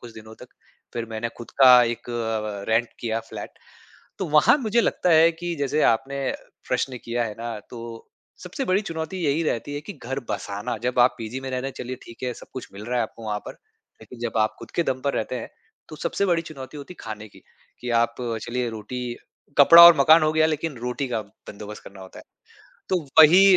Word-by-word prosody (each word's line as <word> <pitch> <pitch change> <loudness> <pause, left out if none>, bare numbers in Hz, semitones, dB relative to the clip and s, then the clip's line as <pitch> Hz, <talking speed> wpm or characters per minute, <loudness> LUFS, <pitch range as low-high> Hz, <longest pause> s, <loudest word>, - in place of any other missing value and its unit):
कुछ 120 -2 -11
दिनों 110 0 -12
तक। - - -22 0.4
फिर 115 -1 -4
मैंने 110 +1 -3
ख़ुद 120 - -9
का 125 -2 +9
एक 120 +1 -3
अ, 110 -3 -3
रेंट 115 +1 +2
किया 115 -1 -2
फ्लैट। 105 -2 -8 0.6
तो 190 - -2
वहाँ 150 - +5
मुझे 235 -3 +1
लगता 180 - +1
है 165 0 +6
कि 170 +1 -4
जैसे 145 +2 0
आपने 135 +4 -3 0.5
प्रश्न 130 -2 -1
किया 120 0 -1
है 105 - -5
ना 115 -1 -5
तो 115 -1 -9 0.4
सबसे - - -4
बड़ी 185 +2 +2
चुनौती 165 -1 -5
यही 145 +3 +1
रहती 145 -1 -2
है 145 - -3
कि 150 - -8
घर 135 -4 -5
बसाना, 105 +4 -4
जब 125 0 -1
आप 125 +1 +5
पीजी 115 +3 -5
में 135 0 -6
रह 130 - -2
रहे 135 +2 -3
चलिए 130 +1 -5
ठीक 115 - -14
है 125 -1 -1
सब - - -13
कुछ 130 - -7
मिल 100 +2 -9
रहा 125 +1 -1
है - - +2
आपको 115 0 -8
वहाँ 105 -1 -2
पर - - -6 0.5
लेकिन 125 - -13
जब 120 -1 -3
आप 110 0 +1
ख़ुद - - -10
के 170 - +2
दम 130 -5 -2
पर 140 - 0
रहते 120 +3 -2
हैं। 120 - -7 0.4
तो 155 - -9
सबसे 200 - -1
बड़ी 170 -3 +1
चुनौती 140 -4 -10
होती 145 +5 -9
खाने 110 -1 -7
की - - -18 0.4
कि 125 - -4
आप 115 0 +2 0.3
चलिए 120 +1 -2
रोटी, 120 +2 -6 0.4
कपड़ा 165 +4 +10
और 170 -1 +10
मकान 155 +4 +6
हो 155 0 +2
गया 155 0 +4
लेकिन 155 -2 -2
रोटी 125 +3 -3
का 115 -3 -1
बंदोबस्त 105 0 -11
करना 100 0 -12
होता 95 -1 -12
है। - - -13 0.6
तो 185 -2 +1 0.2
वही 185 +5 +8
125 Hz, 215 wpm, -24 LUFS, 115-155 Hz, 0.6 s, कपड़ा